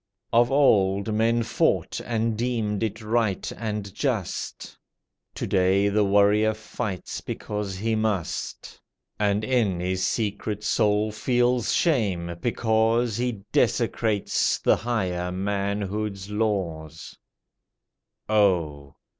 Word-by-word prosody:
Of 120 +2 +4
old 100 -7 +3
men 115 +2 +2
fought 115 - 0
and 115 -1 -1
deemed 110 -3 -1
it 110 0 -3
right 110 -3 0
and 105 -3 -4
just. - - -3 0.6
To - - -3
day 95 +2 +2
the 105 +1 +2
warrior 105 +2 +3
fights 110 -3 -5
because 105 -2 -4
he 110 +3 -1
must, 110 -6 -3 0.4
And 105 0 +1
in 110 -7 +1
his 90 +1 -1
secret 105 -1 -2
soul 105 0 +2
feels 120 +2 +1
shame 95 - +1
because 115 0 +1
He 120 -5 -2
desecrates 105 -3 +1
the - - +3
higher 90 -7 -2
manhood's 100 +1 -2
laws 90 -8 -3 1.1
Oh! 85 -10 +1
105 Hz, 105 wpm, -25 LUFS, 95-115 Hz, 1.1 s, Of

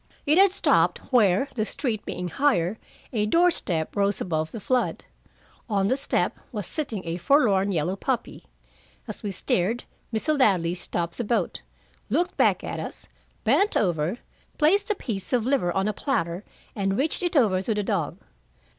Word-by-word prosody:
It 305 +4 +4
had 390 -1 +6
stopped 400 - +3 0.2
where, 210 +1 +4
the 220 - -1
street 220 -1 -3
being 180 0 -4
higher, 195 - +1 0.3
a 210 -2 +1
door 345 +9 +4
step 160 - -2
rose 200 0 +1
above 160 -2 -2
the 225 - -6
flood. 250 +5 0 0.7
On 200 -2 +1
the 260 - +3
step 275 - -1
was 210 -5 -4
sitting 230 - -2
a 165 +1 -3
forlorn 200 - +3
yellow 175 +1 0
puppy. - - -3 0.6
As - - -6
we 205 - -3
stared, 195 +4 0 0.3
Mr. 285 +7 0
Ladley 180 -8 +3
stopped 170 0 -4
the - - 0
boat, 235 +2 -1 0.5
looked 355 +1 0
back - - +3
at - - -4
us, - - -7 0.4
bent 410 +2 +3
over, 175 +1 0 0.4
placed 395 +8 +3
a 425 - +2
piece 220 - -4
of 240 -3 +2
liver 255 -10 +1
on 195 +3 0
a 215 - 0
platter, 175 - -2 0.3
and 195 -1 0
reached 300 +7 0
it 350 -1 -1
over 205 -9 +4
to 215 +3 -1
the 210 - 0
dog. 185 -6 -1
210 Hz, 170 wpm, -25 LUFS, 185-270 Hz, 0.7 s, had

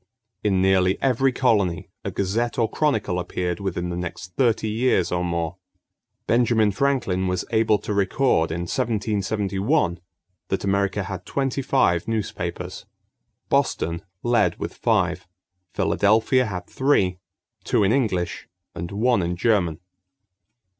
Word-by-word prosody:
In 95 -3 +2
nearly 95 0 +3
every 135 0 +2
colony 105 -9 +1
a - - -2
gazette 110 +5 -1
or 115 -2 +2
chronicle 110 -13 0
appeared 90 0 -3
within 90 -3 -3
the 85 - -3
next 90 +1 -6
thirty 115 -4 +2
years 110 -4 +1
or 90 0 0
more. 85 0 -2 0.7
Benjamin 115 -3 +3
Franklin 100 -6 0
was 90 0 -1
able 110 -2 +3
to 105 - -4
record 100 -2 +2
in 85 +1 -2
1771 105 - 0 0.5
that 95 - -2
America 100 0 0
had 95 0 -6
twenty 135 -1 -1
five 105 -11 +2
newspapers. 110 -2 -4 0.6
Boston 85 +1 0 0.2
led 120 0 +2
with - - -5
five. 90 +1 0 0.4
Philadelphia 110 +5 +2
had 90 -3 -5
three: 95 -11 +1 0.4
two - - +2
in 100 - +3
English 105 -9 -1 0.3
and 85 0 -5
one 115 +2 +2
in 85 0 -1
German. 90 -5 +1
100 Hz, 125 wpm, -23 LUFS, 90-115 Hz, 0.7 s, nearly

